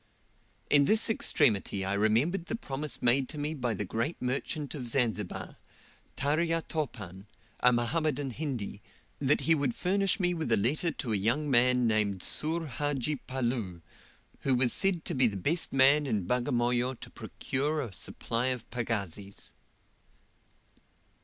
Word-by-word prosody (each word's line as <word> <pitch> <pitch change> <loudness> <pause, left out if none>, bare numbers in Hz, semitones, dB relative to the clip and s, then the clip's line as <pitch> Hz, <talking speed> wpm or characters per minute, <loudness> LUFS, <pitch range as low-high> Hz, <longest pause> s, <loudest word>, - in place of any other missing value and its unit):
In 145 -1 +6
this 220 +6 +3
extremity 100 - +1
I 95 - -1
remembered 115 - +1
the - - -2
promise 150 - -4
made 130 +2 +3
to 155 - -8
me 150 +2 -2
by 125 -6 -2
the 105 - -3
great 115 - -2
merchant 140 +3 -3
of 130 -5 -6
Zanzibar 115 -6 -1 0.6
Tarya 165 +4 +1
Topan 105 - -5 0.3
a 125 - +5
Mohammedan 140 +3 0
Hindi 120 -7 -4 0.4
that 145 +1 +2
he 165 - +3
would 140 -6 0
furnish 195 +3 +1
me 180 -1 +1
with 160 -8 -3
a 110 - +5
letter 140 - +1
to 125 -8 -3
a - - +2
young 120 +9 0
man 125 0 +4
named 105 -4 +1
Soor 165 +2 +1
Hadji 145 +1 -2
Palloo, 120 -10 -3 0.6
who 135 -2 +1
was 125 -1 +4
said 185 -4 +2
to - - -1
be 130 -4 +4
the 100 -3 -3
best 160 - 0
man 140 +2 +5
in 105 -7 -1
Bagamoyo 125 +2 0
to - - -10
procure 150 +4 -2
a 115 -6 -6
supply 115 +5 -2
of 125 -3 -2
pagazis. 105 -5 -4
130 Hz, 150 wpm, -29 LUFS, 115-150 Hz, 0.6 s, In